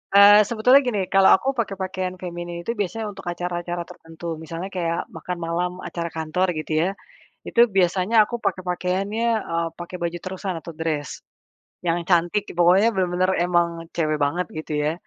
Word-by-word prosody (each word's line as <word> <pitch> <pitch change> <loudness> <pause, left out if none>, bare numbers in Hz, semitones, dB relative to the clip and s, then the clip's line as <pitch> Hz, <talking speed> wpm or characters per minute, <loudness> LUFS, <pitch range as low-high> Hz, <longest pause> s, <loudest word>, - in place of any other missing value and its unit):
Eee, 205 +1 +9
sebetulnya 235 +6 +4
gini, 245 -7 -1
kalau 195 0 +6
aku 270 +7 -1
pakai 225 -6 -2
pakaian 185 -1 -3
feminim 175 -1 -6
itu 230 - -1
biasanya 210 0 -3
untuk 195 - -10
acara-acara 175 0 -3
tertentu. 165 -1 -8
Misalnya 165 +4 -6
kayak 170 -2 -1
makan 180 -1 -5
malam 170 +1 -1
acara 170 -1 -4
kantor, 160 +3 -1
gitu 155 0 -5
ya. 175 - +1 0.6
Itu 235 0 +4
biasanya 185 +2 +1
aku 240 - -5
pakai 185 - -1
pakaiannya, 190 +5 -1 0.3
eee, 165 0 0
pakai 175 +1 -7
baju 170 0 -2
terusan 185 0 -5
atau 170 - -9
dress. 155 -3 -3 0.6
Yang 170 0 +1
cantik, 175 +3 +2
pokoknya 180 +5 +5
bener-bener 185 -1 +1
emang 170 -1 0
cewek 155 -2 +1
banget, 165 +6 +1
gitu 155 0 -5
ya. 155 - +1
180 Hz, 165 wpm, -23 LUFS, 170-195 Hz, 0.6 s, Eee